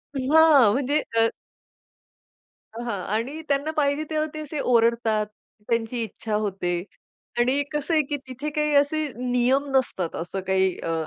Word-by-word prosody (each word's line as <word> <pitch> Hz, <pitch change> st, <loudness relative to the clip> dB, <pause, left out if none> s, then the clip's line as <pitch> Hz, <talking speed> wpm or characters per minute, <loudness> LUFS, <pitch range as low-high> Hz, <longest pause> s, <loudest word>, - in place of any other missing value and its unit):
हां 280 Hz, -3 st, +5 dB
म्हणजे 280 Hz, +3 st, +1 dB, 0.2 s
अ 225 Hz, 0 st, +5 dB, 1.5 s
हां 235 Hz, -4 st, -3 dB
आणि 265 Hz, +8 st, -3 dB
त्यांना 285 Hz, +2 st, 0 dB
पाहिजे 285 Hz, 0 st, +1 dB
तेव्हा 310 Hz, 0 st, 0 dB
ते 310 Hz, -, -6 dB
असे 300 Hz, 0 st, -5 dB
ओरडतात, 230 Hz, -3 st, +2 dB, 0.4 s
त्यांची 230 Hz, +1 st, 0 dB
इच्छा 220 Hz, 0 st, -4 dB
होते 190 Hz, -4 st, -1 dB, 0.6 s
आणि 255 Hz, +4 st, +2 dB
कसं 295 Hz, +2 st, -2 dB
आहे, 315 Hz, -, +5 dB
की 290 Hz, +1 st, -3 dB
तिथे 260 Hz, +4 st, -5 dB
काही 300 Hz, 0 st, 0 dB
असे 295 Hz, +2 st, +2 dB
नियम 250 Hz, +2 st, +1 dB
नसतात. 190 Hz, -10 st, 0 dB
असं 175 Hz, +3 st, -4 dB
काही 190 Hz, -1 st, +2 dB
अ, 165 Hz, -, -2 dB
255 Hz, 140 wpm, -24 LUFS, 225-295 Hz, 1.5 s, हां